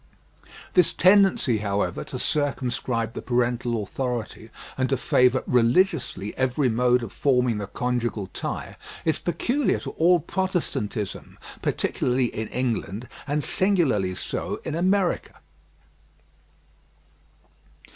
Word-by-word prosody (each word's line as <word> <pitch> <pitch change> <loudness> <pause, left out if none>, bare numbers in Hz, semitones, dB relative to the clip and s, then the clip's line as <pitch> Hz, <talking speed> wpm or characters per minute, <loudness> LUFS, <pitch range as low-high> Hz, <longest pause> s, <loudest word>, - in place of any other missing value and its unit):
This 180 - +4
tendency, 185 - +4
however, 100 -3 -1
to 130 - -6
circumscribe 125 -5 -1
the - - -5
parental 120 -2 0
authority 120 -1 -4 0.3
and 130 -1 0
to 135 - +1
favour 125 +1 +3
religiously 120 - +1
every 130 +1 +1
mode 125 +1 +2
of 115 - -7
forming 125 -5 +2
the 100 - -4
conjugal 120 -3 -2
tie, - - -5 0.3
is 160 - +1
peculiar 240 - 0
to - - -5
all 175 +2 +4
Protestantism, 160 - -3 0.2
particularly 125 -1 0
in 110 0 -3
England, 120 -2 -2 0.2
and 145 +1 0
singularly 140 - +1
so - - -4
in 160 - -4
America. 185 +2 +1
125 Hz, 105 wpm, -25 LUFS, 115-160 Hz, 0.3 s, This